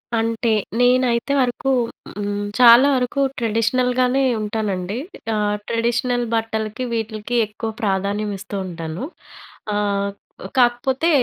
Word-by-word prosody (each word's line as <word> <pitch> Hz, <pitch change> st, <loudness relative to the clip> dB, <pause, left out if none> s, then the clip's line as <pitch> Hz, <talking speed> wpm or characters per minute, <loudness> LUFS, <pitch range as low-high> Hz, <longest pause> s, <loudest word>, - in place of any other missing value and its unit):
అంటే 230 Hz, +1 st, 0 dB, 0.3 s
నేనైతే 245 Hz, +1 st, +3 dB
వరకు 255 Hz, +1 st, 0 dB, 0.5 s
హ్మ్, 205 Hz, 0 st, -2 dB, 0.2 s
చాలా 245 Hz, +2 st, +8 dB
వరకు 255 Hz, +2 st, 0 dB, 0.2 s
ట్రెడిషనల్‌గానే 250 Hz, +3 st, +1 dB, 0.2 s
ఉంటానండి. 205 Hz, -2 st, -2 dB, 0.4 s
ఆ! -, -, 0 dB, 0.3 s
ట్రెడిషనల్ 240 Hz, +1 st, 0 dB
బట్టలకి 225 Hz, +1 st, -2 dB
వీటిలకి 220 Hz, +1 st, -3 dB
ఎక్కువ 215 Hz, +2 st, -5 dB
ప్రాధాన్యం 200 Hz, +1 st, 0 dB
ఇస్తూ 200 Hz, +1 st, -8 dB
ఉంటాను, 165 Hz, +2 st, -6 dB, 0.7 s
ఆహ్, 200 Hz, -1 st, 0 dB, 0.5 s
కాకపోతే 255 Hz, +5 st, +2 dB
230 Hz, 95 wpm, -21 LUFS, 210-245 Hz, 0.7 s, చాలా